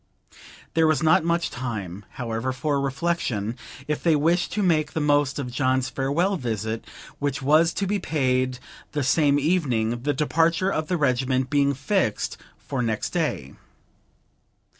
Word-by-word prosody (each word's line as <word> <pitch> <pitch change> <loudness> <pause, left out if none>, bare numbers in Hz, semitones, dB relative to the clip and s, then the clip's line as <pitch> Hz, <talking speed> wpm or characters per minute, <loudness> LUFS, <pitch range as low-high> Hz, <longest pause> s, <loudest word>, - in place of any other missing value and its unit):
There 160 -1 +4
was 155 0 +2
not 160 0 +5
much 170 +1 0
time, 105 -6 -5
however, 120 0 -3
for 140 +2 -1
reflection, 135 -7 -1 0.3
if 150 0 -1
they 165 -2 +3
wished 170 +4 +1
to 210 - 0
make 155 -4 +2
the - - -1
most 145 -2 +2
of 130 -4 -4
John's 130 0 +1
farewell 165 +9 0
visit, 110 -4 -3 0.3
which 140 -1 -2
was 155 +4 +4
to 200 - -1
be 205 +1 0
paid 130 -6 0 0.4
the 145 - 0
same 145 +1 +3
evening, 130 -8 0
the 145 +3 0
departure 165 +6 +2
of 155 -3 -2
the 180 - 0
regiment 130 -2 +1
being 140 -1 +2
fixed 145 - -1 0.2
for 135 -3 -4
next 110 -2 -1
day. 155 - -2
140 Hz, 150 wpm, -24 LUFS, 125-160 Hz, 0.4 s, not